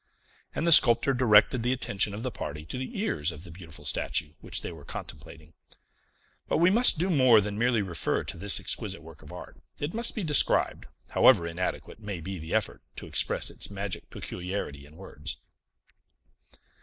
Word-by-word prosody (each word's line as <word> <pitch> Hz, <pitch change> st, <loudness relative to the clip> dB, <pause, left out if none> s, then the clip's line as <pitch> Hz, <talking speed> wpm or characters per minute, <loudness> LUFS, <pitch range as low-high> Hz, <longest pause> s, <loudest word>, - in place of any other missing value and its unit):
And 160 Hz, -, -1 dB
the 170 Hz, -, +3 dB
sculptor 120 Hz, -2 st, +6 dB
directed 120 Hz, -1 st, +4 dB
the 125 Hz, +2 st, +1 dB
attention 100 Hz, -5 st, 0 dB
of 110 Hz, -, -7 dB
the 130 Hz, -, -2 dB
party 75 Hz, -4 st, -6 dB
to 105 Hz, -, -6 dB
the 130 Hz, +9 st, -6 dB
ears 85 Hz, -, 0 dB
of 75 Hz, 0 st, -11 dB
the 90 Hz, -, -11 dB
beautiful 80 Hz, -2 st, -11 dB
statue 75 Hz, -, 0 dB
which -, -, -3 dB
they -, -, -5 dB
were 80 Hz, -4 st, -12 dB
contemplating. -, -, -9 dB, 0.9 s
But -, -, +1 dB
we 170 Hz, +3 st, +4 dB
must 235 Hz, -3 st, +4 dB
do 180 Hz, +4 st, 0 dB
more 130 Hz, -7 st, +6 dB
than 105 Hz, 0 st, -3 dB
merely 115 Hz, -1 st, +1 dB
refer 85 Hz, -5 st, -1 dB
to -, -, -7 dB
this 100 Hz, +3 st, +4 dB
exquisite -, -, -2 dB
work 80 Hz, -2 st, -14 dB
of -, -, -13 dB
art; -, -, -10 dB, 0.2 s
it 145 Hz, +3 st, -3 dB
must 230 Hz, +1 st, 0 dB
be 215 Hz, -, -3 dB
described, 150 Hz, -4 st, +2 dB, 0.2 s
however 85 Hz, -, +5 dB
inadequate 85 Hz, +5 st, -4 dB
may 105 Hz, -4 st, -6 dB
be 95 Hz, +2 st, -6 dB
the 80 Hz, +1 st, -8 dB
effort -, -, -1 dB
to -, -, -7 dB
express -, -, 0 dB
its -, -, -3 dB
magic 100 Hz, -1 st, -6 dB
peculiarity 90 Hz, -6 st, -5 dB
in 75 Hz, -, -16 dB
words. 75 Hz, -2 st, -7 dB
100 Hz, 180 wpm, -27 LUFS, 85-130 Hz, 0.9 s, sculptor